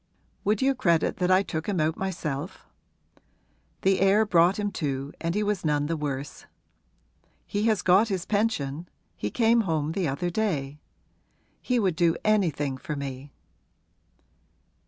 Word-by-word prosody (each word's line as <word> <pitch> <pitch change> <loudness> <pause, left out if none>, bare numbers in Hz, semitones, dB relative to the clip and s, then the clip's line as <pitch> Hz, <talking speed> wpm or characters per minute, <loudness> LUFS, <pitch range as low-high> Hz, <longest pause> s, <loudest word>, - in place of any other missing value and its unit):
Would 210 +4 +1
you 270 +1 +3
credit 170 -10 +1
that 180 0 0
I 185 +1 +5
took 160 -1 -4
him 195 -4 0
out 155 +1 +1
myself? 170 -4 -4 1.2
The 195 0 +3
air 195 +3 +4
brought 175 -1 +4
him 205 -1 -1
to 140 -3 -3
and 170 +2 -1
he 210 - +1
was 205 -2 -1
none 150 -2 +1
the 165 +2 -1
worse. 145 -2 -5 1.0
He 205 +1 -2
has 215 -5 +1
got 190 +5 +5
his 190 -5 -2
pension 175 -8 -1 0.3
he 105 - -3
came 230 - +3
home 160 -6 -1
the 180 0 -1
other 175 +6 -2
day; 150 -9 -2 0.8
he 250 - 0
would 190 -6 +1
do 170 -1 +2
anything 160 -10 +1
for 150 +3 -5
me.' 140 0 -6
175 Hz, 150 wpm, -26 LUFS, 150-205 Hz, 1.2 s, I